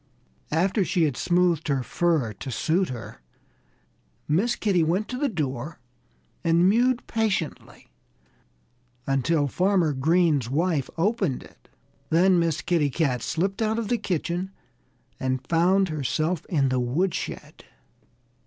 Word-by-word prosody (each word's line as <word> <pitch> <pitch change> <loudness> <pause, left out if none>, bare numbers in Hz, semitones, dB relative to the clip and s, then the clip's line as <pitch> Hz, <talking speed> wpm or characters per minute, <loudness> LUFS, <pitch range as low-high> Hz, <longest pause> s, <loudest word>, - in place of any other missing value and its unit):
After 190 +6 +2
she 175 -1 +1
had 145 -5 +1
smoothed 175 -1 +1
her 135 -3 0
fur 155 -8 0
to 130 - -8
suit 165 - 0
her, 115 - -8 1.1
Miss 205 +11 +1
Kitty 195 -5 +1
went 175 +6 0
to 250 - -4
the 290 -1 +1
door 150 - -4 0.6
and 170 +2 +4
mewed 240 +4 +2
patiently 215 -8 -3 1.1
until 145 +3 +1
Farmer 180 0 +1
Green's 150 -2 +2
wife 155 0 0
opened 190 - 0
it. - - -20 0.4
Then 180 +2 +4
Miss 165 -2 0
Kitty 165 -5 +1
Cat 135 -4 0
slipped 190 - -2
out 220 0 +1
of 225 -3 -3
the 240 - +2
kitchen 175 +1 -2 0.7
and 130 0 -2
found 180 +3 +3
herself 155 +3 -2
in 140 -6 +1
the 130 0 0
woodshed. 150 +10 -3
170 Hz, 125 wpm, -25 LUFS, 145-190 Hz, 1.1 s, and